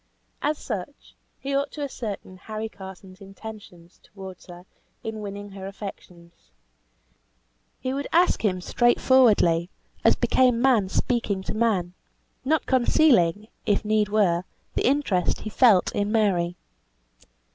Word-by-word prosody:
As 300 Hz, +1 st, 0 dB
such, 220 Hz, +3 st, -7 dB, 0.2 s
he 275 Hz, +1 st, -4 dB
ought 280 Hz, +1 st, 0 dB
to 295 Hz, -, -5 dB
ascertain 215 Hz, -8 st, -6 dB
Harry 215 Hz, +3 st, -5 dB
Carson's 190 Hz, -1 st, -12 dB
intentions 195 Hz, -3 st, -12 dB
towards 190 Hz, -2 st, -11 dB
her 175 Hz, 0 st, -12 dB, 0.4 s
in 220 Hz, -1 st, -5 dB
winning 205 Hz, 0 st, -7 dB
her 190 Hz, 0 st, -8 dB
affections. 180 Hz, -, -11 dB, 1.3 s
He 255 Hz, -, -3 dB
would 280 Hz, +1 st, -3 dB
ask 350 Hz, -5 st, +3 dB
him, 185 Hz, -4 st, 0 dB
straightforwardly, 225 Hz, -7 st, +3 dB, 0.3 s
as -, -, +5 dB
became 250 Hz, -2 st, +3 dB
man 240 Hz, -7 st, +3 dB
speaking 205 Hz, -4 st, -1 dB
to -, -, -4 dB
man, 210 Hz, -6 st, 0 dB, 0.5 s
not 305 Hz, +3 st, +1 dB
concealing, 240 Hz, -, +3 dB, 0.2 s
if 205 Hz, +1 st, +1 dB
need 210 Hz, -1 st, +2 dB
were, 185 Hz, -5 st, +2 dB, 0.3 s
the -, -, +1 dB
interest 250 Hz, -11 st, +1 dB
he 215 Hz, -, -6 dB
felt 220 Hz, -8 st, +4 dB
in 205 Hz, +1 st, -1 dB
Mary. 185 Hz, -6 st, +1 dB
210 Hz, 125 wpm, -25 LUFS, 185-240 Hz, 1.3 s, as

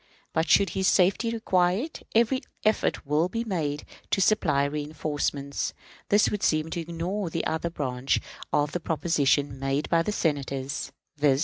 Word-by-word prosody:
But, 160 Hz, +1 st, 0 dB
should 200 Hz, -, +5 dB
his 190 Hz, 0 st, 0 dB
safety 195 Hz, +5 st, +3 dB
require 185 Hz, -6 st, +2 dB
it, 305 Hz, +8 st, -6 dB
every 235 Hz, +3 st, +3 dB, 0.2 s
effort 215 Hz, -6 st, +1 dB
will 150 Hz, +5 st, +2 dB
be 230 Hz, +4 st, -2 dB
made 155 Hz, -9 st, -2 dB, 0.2 s
to -, -, +1 dB
supply 165 Hz, -9 st, +3 dB
reënforcements." 145 Hz, -1 st, -2 dB, 0.4 s
This 205 Hz, +1 st, +4 dB
would 210 Hz, -, -2 dB
seem 155 Hz, +1 st, +1 dB
to 170 Hz, -, -2 dB
ignore 170 Hz, +4 st, -3 dB
the 165 Hz, 0 st, -2 dB
other 160 Hz, +2 st, -1 dB
branch 130 Hz, -5 st, -1 dB, 0.3 s
of 145 Hz, -1 st, +2 dB
the 175 Hz, -, -2 dB
proposition 145 Hz, -4 st, +1 dB
made 135 Hz, +2 st, -1 dB
by 165 Hz, -1 st, +4 dB
the 190 Hz, -, -1 dB
Senators, 140 Hz, -6 st, -2 dB, 0.3 s
viz. 140 Hz, -2 st, +3 dB
160 Hz, 155 wpm, -27 LUFS, 145-190 Hz, 0.4 s, should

